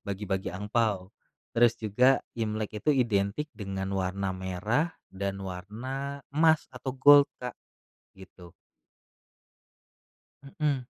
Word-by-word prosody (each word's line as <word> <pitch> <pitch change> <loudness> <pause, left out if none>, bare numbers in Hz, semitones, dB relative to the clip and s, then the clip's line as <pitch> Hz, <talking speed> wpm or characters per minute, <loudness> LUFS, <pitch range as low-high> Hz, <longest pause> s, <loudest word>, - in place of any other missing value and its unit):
bagi-bagi 95 -2 -3
angpao. 105 -1 -1 0.4
Terus 120 -1 +6
juga, 125 +5 +4 0.2
Imlek 110 -1 -2
itu 150 - +5
identik 115 +1 +1
dengan 95 -2 -4
warna 95 +1 -1
merah 100 - -1 0.2
dan 100 0 -4
warna 120 +10 -5
emas 160 +1 +3
atau 130 +1 -4
gold, 145 +2 +7
Kak, 125 -1 -5 0.6
gitu. 95 -2 -14 2.1
Mmm, 150 -3 +2
105 Hz, 100 wpm, -28 LUFS, 95-130 Hz, 2.1 s, gold